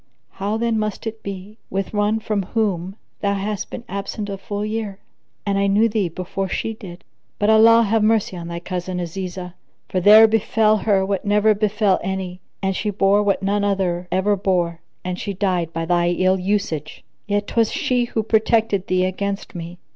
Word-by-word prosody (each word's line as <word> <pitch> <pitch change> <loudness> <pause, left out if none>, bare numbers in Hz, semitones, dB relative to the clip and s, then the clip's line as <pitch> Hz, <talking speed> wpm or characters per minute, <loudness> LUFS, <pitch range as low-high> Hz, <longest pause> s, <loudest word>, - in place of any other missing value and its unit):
How 205 +3 -2
then 230 -1 0
must 215 +1 -3
it 225 0 -5
be 200 +2 -8
with 195 +1 -3
one 210 +1 +1
from 215 -2 -1
whom 190 -3 -1 0.2
thou 200 -1 0
hast 200 +1 -3
been - - -7
absent 200 +2 -4
a 195 - -4
full 205 +1 -4
year, 215 -2 -3 0.5
and 200 -1 +1
I 200 - +2
knew 205 +3 +4
thee 210 -5 0
before 185 +3 -4
she 225 - -2
did? 190 -6 -11 0.3
But 205 +1 +3
Allah 230 +1 +7
have 220 +1 +2
mercy 215 -3 +2
on 170 -1 -6
thy 170 0 -5
cousin 180 0 -4
Azizah, 180 +1 -5 0.4
for 185 - 0
there 215 +4 +8
befel 220 0 +2
her 195 -2 +2
what 195 -1 -2
never 210 +1 +3
befel 210 -1 +1
any 185 -1 -4 0.2
and 190 0 0
she 210 - -1
bore 200 0 +3
what 200 -1 0
none 200 +1 +1
other 185 -3 0
ever 195 +3 +2
bore 175 -4 0 0.2
and 180 0 -3
she 200 -2 -4
died 180 -4 0
by 165 0 -3
thy 175 0 +2
ill 185 +2 +2
usage; 185 -6 -2 0.2
yet 205 0 0
'twas 225 +1 +1
she 250 -1 +1
who 225 -2 -2
protected 220 -2 +2
thee 185 0 +2
against 195 +2 -3
me. 175 0 -7
200 Hz, 185 wpm, -21 LUFS, 185-215 Hz, 0.5 s, there